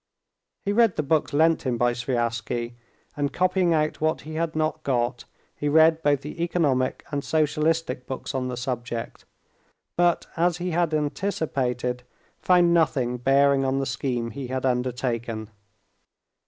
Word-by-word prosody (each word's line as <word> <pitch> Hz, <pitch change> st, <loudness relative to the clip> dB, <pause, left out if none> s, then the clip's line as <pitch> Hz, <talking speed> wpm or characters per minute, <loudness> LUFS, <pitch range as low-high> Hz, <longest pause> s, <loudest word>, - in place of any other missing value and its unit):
He 200 Hz, -, +1 dB
read 230 Hz, -3 st, +4 dB
the 150 Hz, -, -1 dB
books 150 Hz, +2 st, +1 dB
lent 160 Hz, +3 st, +3 dB
him 125 Hz, -4 st, -1 dB
by 120 Hz, +1 st, +2 dB
Sviazhsky, 120 Hz, -1 st, -2 dB, 0.4 s
and 145 Hz, -1 st, -1 dB
copying 185 Hz, -1 st, +2 dB
out 155 Hz, -2 st, 0 dB
what 155 Hz, 0 st, +1 dB
he 155 Hz, -, -9 dB
had 165 Hz, 0 st, -2 dB
not 155 Hz, 0 st, -1 dB
got, 120 Hz, -3 st, -1 dB, 0.3 s
he 145 Hz, -, -2 dB
read 160 Hz, +1 st, +5 dB
both 145 Hz, -3 st, +2 dB
the 150 Hz, +3 st, -7 dB
economic 145 Hz, -7 st, 0 dB
and 140 Hz, -1 st, -2 dB
socialistic 155 Hz, -3 st, 0 dB
books 130 Hz, +1 st, -5 dB
on 130 Hz, -1 st, -1 dB
the 125 Hz, -1 st, -4 dB
subject, 120 Hz, -2 st, -4 dB, 0.7 s
but, 175 Hz, -1 st, +2 dB
as 170 Hz, 0 st, +1 dB
he 180 Hz, 0 st, -3 dB
had 170 Hz, -1 st, +1 dB
anticipated, 135 Hz, -6 st, -1 dB, 0.4 s
found 175 Hz, -2 st, +4 dB
nothing 140 Hz, -7 st, +1 dB
bearing 135 Hz, +2 st, +3 dB
on 135 Hz, 0 st, 0 dB
the 135 Hz, -, 0 dB
scheme 125 Hz, -2 st, -2 dB
he 135 Hz, -2 st, -6 dB
had 130 Hz, +1 st, -3 dB
undertaken. 120 Hz, -3 st, -2 dB
140 Hz, 150 wpm, -25 LUFS, 125-160 Hz, 0.7 s, read